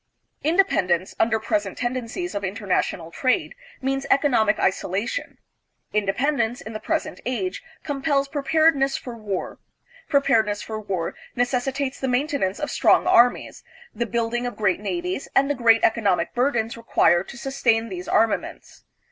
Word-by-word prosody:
Independence, 205 - +2
under 220 0 +2
present 210 -3 -2
tendencies 255 +8 -3
of 200 - -3
international 190 -4 -2
trade, 255 +7 0 0.3
means 270 +1 -1
economic 255 -7 +3
isolation. 195 - -1 0.6
Inde 205 -2 +1
pendence, 270 -3 0
in 220 - -8
the 215 - -4
present 310 +2 -3
age, 260 +10 -3 0.2
compels 280 -1 0
preparedness 285 -1 +2
for 245 -2 -8
war; 210 -4 -5 0.5
preparedness 220 -8 +2
for 220 -1 -5
war 190 -5 -3 0.2
necessitates 260 +2 -1
the 265 - -2
maintenance 250 - 0
of 295 - -3
strong - - +4
armies, 245 +1 +3 0.3
the 235 - -2
building 235 +2 -1
of 245 - -6
great 195 -4 +1
navies, 345 - -3
and 275 +1 +4
the - - +2
great 230 -4 +4
economic 215 -5 +2
burdens 240 -3 0
required 175 -6 +2
to - - -9
sustain 230 -4 0
these 180 -2 -6
armaments. 220 -2 -1
240 Hz, 140 wpm, -23 LUFS, 210-275 Hz, 0.6 s, strong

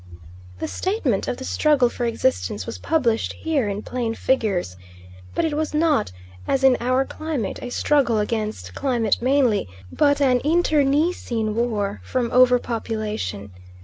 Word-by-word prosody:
The - - -3
statement 350 - -1
of 245 - -2
the - - -7
struggle 290 -4 +3
for 240 0 -3
existence 100 - -1
was 90 - -6
published 235 - 0
here 290 -9 -1
in 200 +1 -4
plain 235 -3 -3
figures, 205 - 0 0.6
but - - +1
it 315 - -1
was 305 0 -2
not, 305 - +2 0.4
as 270 0 +1
in 265 -1 +6
our 255 +2 +1
climate, 300 -11 -4
a 250 - -5
struggle 260 -3 +2
against 215 0 -3
climate 240 -6 0
mainly, 250 - +2 0.2
but 285 -1 +2
an 255 -3 +3
internecine 295 -7 +1
war 210 -3 -1
from 245 -2 -2
over 250 0 +6
population. 210 - -4
245 Hz, 145 wpm, -22 LUFS, 215-285 Hz, 0.6 s, in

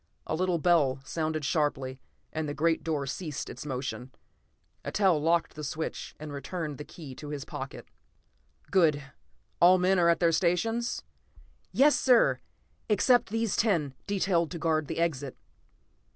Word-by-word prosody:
A - - -3
little 180 +1 +1
bell 150 -6 +3
sounded 155 -1 -2
sharply, 135 -5 -1 0.3
and 155 -1 -2
the 145 - -4
great 165 +2 +1
door 150 -4 -1
ceased 150 +2 -5
its - - -8
motion. 130 -1 -4 0.7
Eitel 185 -7 +2
locked 165 +1 +1
the 155 - -8
switch 155 +3 -4
and 150 -1 -7
returned 150 +1 -5
the - - -5
key 145 -3 -10
to 145 +3 -9
his 145 -1 -5
pocket. 140 -4 -7 0.8
"Good. 155 -7 +3 0.6
All 180 +2 +7
men 185 +1 +3
are 170 -1 +4
at 170 - +3
their 170 -1 +4
stations?" 195 +8 0
I - - -40
asked - - -41 0.7
briskly. - - -3
"Yes, 295 +1 +7
sir! 250 -3 +5
All - - -41 0.3
except 245 +3 +3
these 225 0 0
ten, 170 - +1
detailed 185 -5 +1
to 175 - -5
guard 155 -2 0
the - - -4
exit." 145 -6 -1
160 Hz, 165 wpm, -29 LUFS, 145-180 Hz, 0.8 s, All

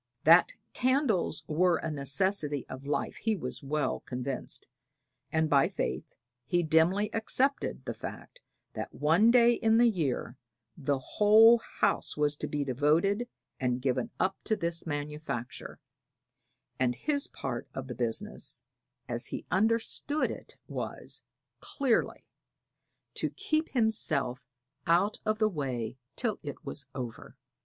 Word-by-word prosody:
That - - +7 0.2
candles 250 - +1
were 170 +3 +2
a 160 - -3
necessity 145 +1 +1
of 135 +2 -8
life 145 -1 -1
he 225 -1 0
was 130 -9 -5
well 145 -1 -1
convinced, 130 +1 -4 0.6
and 160 0 +2
by 140 -2 +4
faith 65 +1 -4 0.3
he 175 +4 +2
dimly 170 +6 +3
accepted 260 +5 0
the - - -3
fact - - -9 0.3
that - - -6
one 165 +10 +4
day 240 0 +6
in 225 -1 +3
the 240 - +6
year 145 - -1 0.4
the 145 -3 0
whole 215 - +6
house - - -1
was 150 0 +1
to - - -4
be 145 -1 -1
devoted 160 - +1 0.3
and 125 -1 0
given 130 -1 0
up 190 +1 +1
to 220 - +2
this 170 -4 -1
manufacture; 145 -4 -5 1.0
and 125 -1 +2
his 285 - +1
part 120 -3 -5
of 135 - -4
the 130 - -6
business, 115 -1 -2 0.4
as 120 0 -2
he - - -6
understood 230 +9 +1
it, - - -9
was, - - -5 0.4
clearly, 265 -5 0 0.9
to - - -1
keep 310 +1 -1
himself 155 - +1 0.4
out 180 +5 +3
of 215 0 +2
the 215 -1 +3
way 130 - -3 0.2
till 225 -4 -1
it 145 -2 -8
was 140 -3 -5
over. 120 -3 -7
160 Hz, 130 wpm, -30 LUFS, 135-220 Hz, 1.0 s, That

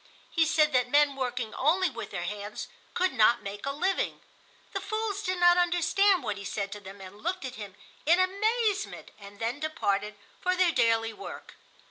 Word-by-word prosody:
He 325 -2 +3
said 305 -2 +3
that 250 -1 +2
men 290 0 +4
working 250 -4 -3
only 350 +7 +2
with 235 - -7
their 175 -3 -4
hands 205 +3 -5 0.3
could 370 -3 +1
not 235 0 +4
make 205 +5 -6
a - - +1
living. 365 +7 -1 0.5
The 390 - -2
fools 425 0 -2
did 370 -3 -2
not 350 0 +6
understand 355 +1 +3
what 210 -4 -2
he 200 - -7
said 200 0 -3
to 205 - -6
them 200 0 -11
and 190 +2 -11
looked 350 -2 -2
at 260 - -5
him 205 -3 -8 0.3
in 340 +3 +6
amazement, 420 +3 0
and 200 0 -12
then 230 +6 -2
departed 210 -9 -1 0.3
for 365 0 +1
their 365 -2 +4
daily 225 -4 +2
work. - - -9
285 Hz, 185 wpm, -28 LUFS, -, 0.5 s, not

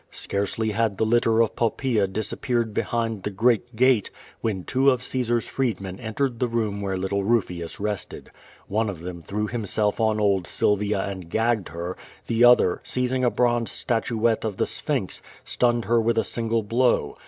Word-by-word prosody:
Scarcely 100 +2 -2
had 110 -2 0
the 110 - +1
litter 115 0 +3
of 110 - -3
Popi>aea 115 -3 0
disappeared 115 +2 -1
behind 115 -1 -1
the 105 - -3
great 115 +3 +1
gate, 125 -3 +3 0.3
when 100 -5 -2
two 135 +6 +3
of 125 -2 +1
Caesar's 120 -3 0
freedmen 100 -8 -2
entered 120 +2 -2
the 125 - +1
room 110 -4 -1
where 95 -1 -2
little 95 +1 -1
Kufius 90 -6 -1
rested. 105 -1 -4 0.4
One 110 +2 0
of 90 -5 -6
them 85 -1 -7
threw 105 +5 -3
himself 105 -2 -1
on 110 -1 +2
old 100 -4 +2
Sylvia 105 -1 +1
and 95 -4 -6
gagged 110 -1 0
her; 85 +3 -5 0.3
the 115 +1 +2
other, 120 -7 +5
seizing 130 0 -1
a 125 - +4
bronze 120 -1 +1
statuette 115 -1 0
of 110 -4 -3
the - - +1
Sphinx, - - -2 0.2
stunned 120 -2 +1
her 115 +2 +3
with 115 +1 +1
a - - +3
single 115 -1 -1
blow. 120 +4 +1
110 Hz, 170 wpm, -24 LUFS, 100-120 Hz, 0.4 s, other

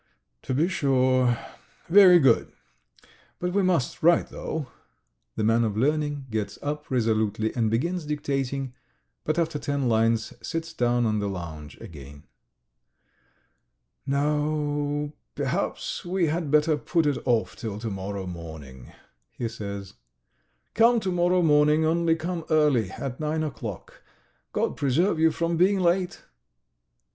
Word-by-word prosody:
"To 130 - -3
be 155 +6 +2
sure... 130 -6 +2 0.5
very 185 0 +8
good. 135 -8 +3 0.9
But 180 0 -3
we 200 - +3
must 180 -9 0
write, 170 +1 +4
though." 160 -3 -4 0.7
The - - -1
man 115 +2 +3
of 105 -2 -1
learning 145 +2 0
gets 105 -2 -3
up 150 +1 -4
resolutely 110 -3 0
and 115 -3 +1
begins 165 +9 -1
dictating, 135 -3 -2 0.5
but 155 +2 0
after 165 -3 0
ten 140 -3 -1
lines 115 0 +1
sits 165 0 -4
down 120 -4 +1
on 110 -1 +1
the 100 -1 -2
lounge 80 -5 -7
again. 70 -2 -11 1.8
"No.... 145 0 -1 0.2
Perhaps - - -2
we 180 0 0
had 160 0 -1
better 150 +1 +3
put 165 +2 0
it 145 -3 0
off 120 -3 +1
till 110 -5 -5
to 110 0 -4
morrow 95 0 -5
morning," 80 -8 -9 0.5
he 120 - -2
says. 100 -3 -7 0.8
"Come 230 +1 +5
to 190 - -1
morrow 175 0 +2
morning, 150 0 +4
only 165 0 +2
come 170 +1 -4
early, 150 - +3
at 130 +5 -6
nine 155 +1 -1
o'clock. 120 - -7 0.5
God - - -1
preserve 160 +6 +1
you 160 0 +5
from 170 +1 -1
being 190 +3 +3
late!" 180 0 0
145 Hz, 135 wpm, -26 LUFS, 115-165 Hz, 1.8 s, very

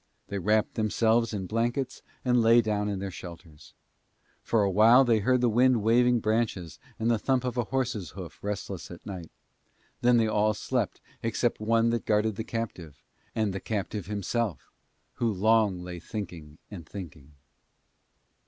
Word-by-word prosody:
They 100 - -3
wrapped 105 +3 +1
themselves 115 +1 +2
in 100 -3 -3
blankets 120 +5 -2 0.2
and 125 -1 +4
lay 115 +1 +6
down 105 -2 -1
in 100 - -2
their 95 0 -4
shelters. 85 -3 -11 0.7
For 115 -3 +1
a 100 - +1
while 115 +7 +6
they 115 -3 +3
heard 125 +4 +2
the 125 - +3
wind 120 0 +3
waving 120 +1 +4
branches 110 -6 -1 0.2
and 115 +1 +1
the 115 - +2
thump 130 +2 +1
of 125 -2 -2
a 120 -2 0
horse's 120 -9 -2
hoof - - -8
restless 100 -3 -5
at 85 - -11
night; 90 -5 -7 0.7
then 120 0 +5
they 115 - +3
all 105 0 +2
slept 120 -2 -2 0.2
except 115 +1 0
one 115 +1 +2
that 120 -1 -2
guarded 105 0 +2
the 110 - -4
captive, 90 - -6 0.3
and 110 -3 0
the 95 - -3
captive 105 -2 -4
himself 105 - -2 0.5
who 115 -2 +1
long 105 -2 +2
lay 90 -1 -7
thinking 85 -6 -7
and 85 -6 -9
thinking. 75 -7 -9
110 Hz, 160 wpm, -28 LUFS, 95-115 Hz, 0.7 s, lay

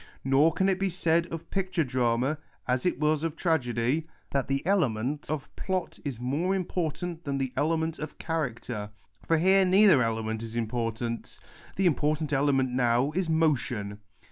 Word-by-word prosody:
" - - -28
Nor 135 +5 +4
can 190 - +1
it 190 -1 +1
be 195 0 +1
said 170 -1 +1
of 165 -1 -7
picture 185 -3 0
drama, 125 +2 0 0.3
as 125 +6 +1
it - - -1
was 150 0 +2
of 165 -1 -2
tragedy, 145 -2 0 0.2
that 140 -2 0
the 135 +2 -1
element 145 - 0
of 150 -3 -4
plot 185 -2 -3
is 135 -6 -4
more 150 +10 0
important 175 -2 -3
than 140 -2 -2
the 130 -2 -2
element 160 +1 0
of 155 - -6
character. 120 -9 -3 0.4
For 165 - +4
here 190 +4 +5
neither 190 -5 +6
element 110 -1 -1
is 115 0 -7
important. 115 0 -3 0.4
The 195 - +1
important 155 -2 +1
element 135 -2 +2
now 125 +2 +2
is 175 +1 -1
motion. 125 -10 0
150 Hz, 165 wpm, -28 LUFS, 125-165 Hz, 0.4 s, neither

